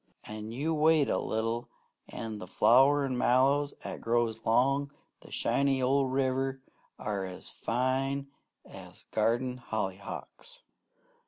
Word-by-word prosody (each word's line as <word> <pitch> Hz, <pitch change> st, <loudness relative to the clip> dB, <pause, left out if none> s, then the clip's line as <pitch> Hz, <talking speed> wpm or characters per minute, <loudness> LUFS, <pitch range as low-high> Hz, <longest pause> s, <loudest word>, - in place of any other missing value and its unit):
An' 110 Hz, +1 st, -7 dB
you 145 Hz, +7 st, -1 dB
wait 155 Hz, -1 st, +4 dB
a -, -, +1 dB
little, 115 Hz, +2 st, -2 dB, 0.4 s
an' 110 Hz, -2 st, -6 dB
the 90 Hz, -, -8 dB
flowerin' 135 Hz, +5 st, +4 dB
mallows 140 Hz, +4 st, +3 dB
'at -, -, -6 dB
grows 115 Hz, -1 st, 0 dB
long 135 Hz, +5 st, +2 dB, 0.3 s
the -, -, -15 dB
shinin' 135 Hz, -1 st, +1 dB
old 135 Hz, 0 st, +2 dB
river 135 Hz, 0 st, 0 dB, 0.4 s
are 100 Hz, -3 st, -3 dB
fine 130 Hz, +3 st, -1 dB, 0.4 s
as -, -, -12 dB
garden 120 Hz, +4 st, +1 dB
hollyhocks. 100 Hz, -4 st, -6 dB
130 Hz, 110 wpm, -30 LUFS, 115-135 Hz, 0.4 s, wait